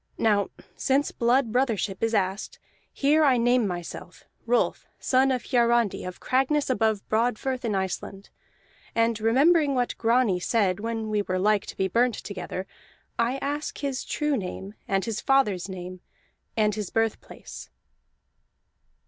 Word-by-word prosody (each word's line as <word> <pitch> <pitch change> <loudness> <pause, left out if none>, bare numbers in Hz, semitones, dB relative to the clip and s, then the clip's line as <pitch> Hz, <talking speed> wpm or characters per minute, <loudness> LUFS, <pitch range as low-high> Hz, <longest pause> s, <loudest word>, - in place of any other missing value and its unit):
Now 205 -3 +2 0.3
since 275 +2 +1
blood 240 0 +2
brothership 225 -6 0
is 225 0 +1
asked, 195 0 -1 0.3
here 300 +3 +3
I 265 -4 +4
name 240 -1 +3
myself: 175 0 -7 0.2
Rolf, 240 +1 +1
son 260 +1 +2
of 255 -2 0
Hiarandi, 235 -3 +2
of 180 0 -7
Cragness 270 +2 +1
above 220 -4 0
Broadfirth 245 +3 0
in 220 -4 -1
Iceland. 190 +1 -4 0.6
And 230 -1 +1
remembering 280 +6 +4
what 245 -1 0
Grani 230 -5 +2
said 195 -1 +1
when 225 0 -3
we 210 -1 +1
were 185 -2 -2
like 205 +2 +2
to - - -8
be 190 - +1
burnt 235 +4 +2
together, 185 -1 -6 0.5
I 235 +3 +1
ask 290 +2 -3
his 275 -2 -3
true 300 -1 -1
name, 195 -2 -5
and 195 0 0
his 225 -3 -3
father's 210 -9 +2
name, 185 -1 -7 0.6
and 210 -1 +3
his 210 -3 -4
birthplace." 225 -1 -4
225 Hz, 140 wpm, -26 LUFS, 200-255 Hz, 0.6 s, I